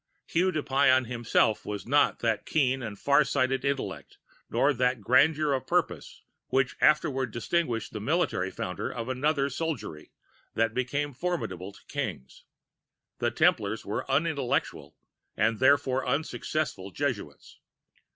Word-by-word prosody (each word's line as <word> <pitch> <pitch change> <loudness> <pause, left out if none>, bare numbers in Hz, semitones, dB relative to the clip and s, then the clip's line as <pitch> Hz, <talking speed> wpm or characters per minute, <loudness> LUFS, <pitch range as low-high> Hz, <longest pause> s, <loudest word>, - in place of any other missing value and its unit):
] - - -48
"Hugues 180 +1 +2
de 155 - 0
Payens 130 -1 +3
himself 115 -2 +1
had 105 +1 -6
not 145 +3 +3
that 115 -3 0
keen 130 -4 +1
and 110 -4 -6
far 140 +5 +4
sighted 130 -1 0
intellect 140 -1 -3 0.3
nor 145 +1 +2
that 125 -2 0
grandeur 145 +7 +3
of 130 - -2
purpose - - -1 0.2
which 130 -1 +1
afterward 140 -4 +3
distinguished 120 0 -2
the 105 - -4
military 125 - 0
founder 90 -1 -4
of 115 0 -5
another 140 +2 +1
soldiery 140 - -4 0.5
that 115 -1 +1
became 140 +4 -2
formidable 115 - -3
to - - -19
kings. 65 0 -5 0.7
The - - +1
Templars 105 +1 +1
were 105 +6 -4
unintelligent 140 -2 -1 0.4
and 110 +1 +1
therefore 130 -1 +3
unsuccessful 140 - -2
Jesuits. 105 - -4
130 Hz, 130 wpm, -28 LUFS, 115-145 Hz, 0.7 s, far